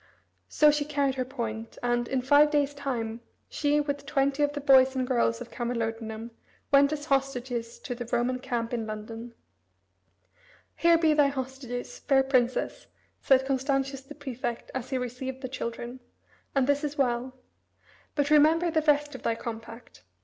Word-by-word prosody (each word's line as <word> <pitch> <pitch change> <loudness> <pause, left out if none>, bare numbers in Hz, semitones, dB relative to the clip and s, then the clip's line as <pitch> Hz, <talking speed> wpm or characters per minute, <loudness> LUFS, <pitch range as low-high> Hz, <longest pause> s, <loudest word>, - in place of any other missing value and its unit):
So 300 -1 +5
she 295 0 0
carried 285 -2 0
her 255 -1 -2
point, 230 -4 -5
and, 240 0 +1
in 260 -2 -1
five 290 +3 +6
days' 290 -1 +1
time, 240 -5 -3 0.3
she, 295 0 +1
with 285 -1 -3
twenty 275 0 +1
of 290 0 +2
the 290 - -3
boys 265 -2 +5
and 260 -1 0
girls 240 -2 +1
of 240 - -8
Camalodunum, 225 -1 -3 0.4
went 280 0 +6
as 295 -1 -3
hostages 255 -4 -1
to - - -5
the 240 -1 -6
Roman 245 +1 +1
camp 235 -2 -3
in 225 -2 -2
London. 225 +2 -7 1.4
"Here 335 0 +5
be 320 -2 +3
thy 295 -2 +5
hostages, 260 -2 -5
fair 270 -2 +3
Princess," 255 -2 0 0.3
said 265 -1 +4
Constantius 270 0 -1
the 270 +2 -12
prefect 250 -4 -5
as 260 -2 -4
he 265 - 0
received 255 +2 -5
the - - -2
children; 240 0 -5 0.6
"and 270 -2 +3
this 285 +2 +1
is 295 0 -3
well. 255 -1 0 0.8
But 290 0 0
remember 320 +3 +5
the 315 -1 +2
rest 295 -1 +2
of 260 - -8
thy 230 - 0
compact. 230 - -8
265 Hz, 165 wpm, -28 LUFS, 240-285 Hz, 1.4 s, five